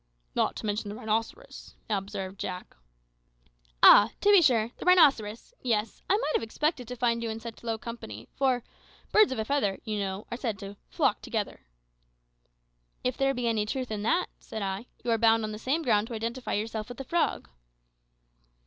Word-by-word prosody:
"Not -, -, +1 dB
to -, -, -6 dB
mention 205 Hz, 0 st, -2 dB
the 205 Hz, -, -6 dB
rhinoceros," 220 Hz, +1 st, -4 dB
observed 195 Hz, -2 st, -4 dB
Jack. 185 Hz, -1 st, -6 dB, 1.1 s
"Ah! 205 Hz, +2 st, +9 dB
to 410 Hz, -, +5 dB
be 400 Hz, -3 st, +8 dB
sure 235 Hz, -7 st, +3 dB
the -, -, -8 dB
rhinoceros; 275 Hz, -, +4 dB
yes, 225 Hz, -3 st, -1 dB
I 400 Hz, -, +4 dB
might 435 Hz, -, -1 dB
have -, -, +2 dB
expected 250 Hz, +3 st, -2 dB
to 250 Hz, -, -5 dB
find 235 Hz, -1 st, +1 dB
you 230 Hz, -, -2 dB
in 220 Hz, 0 st, -4 dB
such 225 Hz, 0 st, -9 dB
low 225 Hz, -1 st, -2 dB
company, 220 Hz, -, -8 dB
for 260 Hz, -3 st, +1 dB, 0.5 s
`birds 430 Hz, -6 st, +6 dB
of 260 Hz, -, -2 dB
a 220 Hz, -, -1 dB
feather,' 245 Hz, -8 st, 0 dB
you 215 Hz, -3 st, -3 dB
know, 195 Hz, 0 st, -3 dB
are 235 Hz, -, -3 dB
said 230 Hz, -5 st, -3 dB
to 200 Hz, +1 st, -8 dB, 0.2 s
`flock -, -, +1 dB
together.'" -, -, -4 dB, 1.4 s
"If 250 Hz, 0 st, 0 dB
there 270 Hz, 0 st, +1 dB
be 245 Hz, -1 st, -1 dB
any 215 Hz, -2 st, 0 dB
truth 255 Hz, +1 st, -3 dB
in 210 Hz, -1 st, -3 dB
that," 340 Hz, -, +1 dB
said 220 Hz, -, -6 dB
I, 195 Hz, +4 st, -4 dB, 0.2 s
"you 240 Hz, -, 0 dB
are 225 Hz, -, +2 dB
bound, 225 Hz, 0 st, +4 dB
on 215 Hz, -, -3 dB
the 215 Hz, -, -6 dB
same 290 Hz, +8 st, 0 dB
ground, 215 Hz, -4 st, +2 dB
to 235 Hz, -, -6 dB
identify 235 Hz, +3 st, -3 dB
yourself 215 Hz, +1 st, -3 dB
with 245 Hz, -, -8 dB
the 270 Hz, -, -5 dB
frog." 335 Hz, +6 st, 0 dB
225 Hz, 190 wpm, -28 LUFS, 210-255 Hz, 1.4 s, Ah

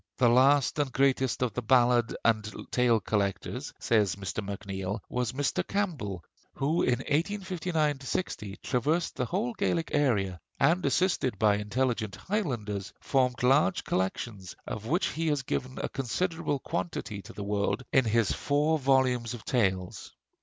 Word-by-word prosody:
"The 125 Hz, -3 st, +5 dB
last 135 Hz, +4 st, +4 dB
and 140 Hz, -3 st, 0 dB
greatest 130 Hz, -1 st, +2 dB
of 125 Hz, -, -1 dB
the 125 Hz, -, -2 dB
ballad 120 Hz, 0 st, +3 dB
and 110 Hz, -2 st, +2 dB, 0.2 s
tale 120 Hz, -2 st, +3 dB
collectors," 100 Hz, -1 st, -2 dB
says 105 Hz, -5 st, +2 dB
Mr. 100 Hz, +1 st, -4 dB
MacNeill, 100 Hz, 0 st, -4 dB
"was 125 Hz, -1 st, -1 dB
Mr. 140 Hz, +1 st, -1 dB
Campbell, 140 Hz, -, -2 dB, 0.3 s
who 155 Hz, +5 st, +1 dB
in 125 Hz, 0 st, +1 dB
1859 165 Hz, -2 st, -1 dB
60 120 Hz, -, -3 dB
traversed 150 Hz, +7 st, 0 dB
the 125 Hz, -, -1 dB
whole 210 Hz, -, -1 dB
Gaelic 170 Hz, -6 st, -1 dB
area; 105 Hz, -11 st, +1 dB, 0.2 s
and 175 Hz, +2 st, +3 dB
assisted 140 Hz, -, +1 dB
by 105 Hz, 0 st, +3 dB
intelligent 110 Hz, 0 st, -1 dB
Highlanders 115 Hz, -, -3 dB
formed 125 Hz, -3 st, +1 dB
large 130 Hz, -6 st, +3 dB
collections, 95 Hz, +1 st, -3 dB
of 110 Hz, 0 st, -5 dB
which 170 Hz, +9 st, +1 dB
he 165 Hz, +1 st, -2 dB
has 145 Hz, -3 st, +1 dB
given 130 Hz, +1 st, -3 dB
a -, -, -1 dB
considerable 145 Hz, +4 st, -1 dB
quantity 100 Hz, -2 st, -4 dB
to -, -, -12 dB
the 105 Hz, -, -6 dB
world 100 Hz, +3 st, -1 dB
in 130 Hz, -2 st, +5 dB
his 115 Hz, -2 st, +2 dB
four 150 Hz, +3 st, +1 dB
volumes 130 Hz, -3 st, +2 dB
of 115 Hz, -, -12 dB
tales. 95 Hz, -7 st, -1 dB
125 Hz, 145 wpm, -29 LUFS, 105-145 Hz, 0.3 s, The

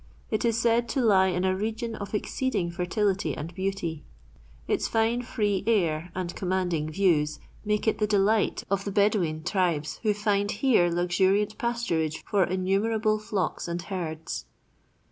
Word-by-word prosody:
It 215 Hz, -, 0 dB
is 230 Hz, -2 st, +2 dB
said 235 Hz, 0 st, +2 dB
to 270 Hz, -, -1 dB
lie 200 Hz, -6 st, +5 dB
in 180 Hz, 0 st, 0 dB
a 185 Hz, 0 st, +2 dB
region 225 Hz, +3 st, -3 dB
of 205 Hz, -1 st, -5 dB
exceeding 210 Hz, -6 st, -1 dB
fertility 190 Hz, +3 st, 0 dB
and 160 Hz, +4 st, -6 dB
beauty. 185 Hz, -5 st, -3 dB, 0.6 s
Its -, -, 0 dB
fine, 225 Hz, +2 st, +1 dB
free 210 Hz, -6 st, -1 dB
air 170 Hz, -6 st, +1 dB
and 180 Hz, -1 st, -3 dB
commanding 180 Hz, -4 st, -1 dB
views 155 Hz, -4 st, +2 dB, 0.3 s
make 210 Hz, 0 st, 0 dB
it 220 Hz, -, +2 dB
the 210 Hz, -, +2 dB
delight 210 Hz, +1 st, +2 dB
of 195 Hz, 0 st, +1 dB
the 200 Hz, -, -3 dB
Bedaween 190 Hz, -6 st, +1 dB
tribes 175 Hz, -6 st, 0 dB
who 215 Hz, -2 st, +1 dB
find 205 Hz, -1 st, +1 dB
here 210 Hz, -5 st, +3 dB
luxuriant 190 Hz, +4 st, +1 dB
pasturage 200 Hz, -11 st, -1 dB
for 200 Hz, -2 st, +2 dB
innumerable 205 Hz, +5 st, +1 dB
flocks 200 Hz, -6 st, -2 dB
and 170 Hz, 0 st, -3 dB
herds. 170 Hz, -4 st, -5 dB
195 Hz, 150 wpm, -27 LUFS, 175-215 Hz, 0.6 s, lie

